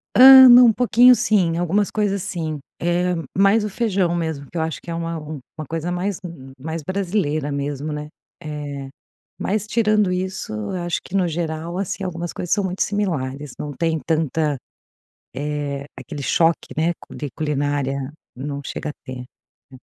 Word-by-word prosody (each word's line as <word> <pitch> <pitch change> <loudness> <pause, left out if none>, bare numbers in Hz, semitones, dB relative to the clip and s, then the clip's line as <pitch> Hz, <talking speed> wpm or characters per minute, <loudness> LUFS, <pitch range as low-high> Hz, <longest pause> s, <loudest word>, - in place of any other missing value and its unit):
Ah, 260 0 +11
na 245 +1 +10
um 235 -2 +6
pouquinho, 245 +1 +6
sim, 180 -8 +2
algumas 185 +4 +1
coisas, 200 -2 0
sim, 160 -4 -3 0.2
é 175 +1 +1 0.2
mais 200 +3 +4
o 210 - -2
feijão 195 -5 0
mesmo, 160 -4 -3
que 175 - -7
eu - - +1
acho 160 -4 -3
que - - -11
é 165 - -2
uma 165 0 -3
uma 155 0 -8
coisa 165 +2 -3
mais 185 +3 -2 0.4
mais 160 +4 -4
brasileira 170 -5 -1
mesmo, 140 +1 -3
né. 150 0 -5 0.3
Eh, 145 -3 -6 0.5
mas, 210 +1 -1
tirando 215 -3 +2
isso, 185 - -3 0.2
acho 175 -2 -2
que 180 - -11
no 185 -3 +2
geral, 165 +1 -3
assim, 195 +1 -3
algumas 175 -2 -4
coisas 180 - -4
são 205 -1 +2
muito 185 0 -1
similares, 150 -9 -2
não 150 - -5
tem 160 +3 0
tanta. 155 -2 0 0.8
É 145 -1 -3
aquele 145 -2 -7
choque, 165 +4 +1
né, 165 +3 +1 0.2
de 145 - -5
culinária, 145 -2 -1 0.2
não 140 +2 -5
chega 155 - -4
a - - -6
ter, 125 -1 -7 0.5
é. - - -10
165 Hz, 165 wpm, -21 LUFS, 150-190 Hz, 0.8 s, Ah